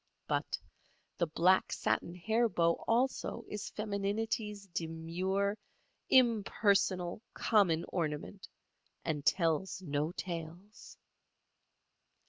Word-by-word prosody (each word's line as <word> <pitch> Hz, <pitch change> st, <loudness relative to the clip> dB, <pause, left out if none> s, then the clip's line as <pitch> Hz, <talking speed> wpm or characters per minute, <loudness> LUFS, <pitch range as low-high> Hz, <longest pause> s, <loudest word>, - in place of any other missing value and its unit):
But -, -, -1 dB, 0.6 s
the 170 Hz, -, +2 dB
black 180 Hz, +4 st, +3 dB
satin 170 Hz, -, -1 dB
hair 220 Hz, +6 st, +1 dB
bow 170 Hz, -3 st, +1 dB
also 235 Hz, -1 st, 0 dB
is 210 Hz, -1 st, -5 dB
femininity's 210 Hz, 0 st, -2 dB
demure, 180 Hz, +4 st, -1 dB, 0.5 s
impersonal, 200 Hz, -6 st, +3 dB
common 180 Hz, -7 st, +3 dB
ornament, 165 Hz, +3 st, -3 dB, 0.6 s
and 150 Hz, -3 st, -1 dB
tells 170 Hz, +3 st, +1 dB
no 150 Hz, 0 st, -1 dB
tales. 175 Hz, +4 st, -7 dB
190 Hz, 85 wpm, -33 LUFS, 165-210 Hz, 0.6 s, black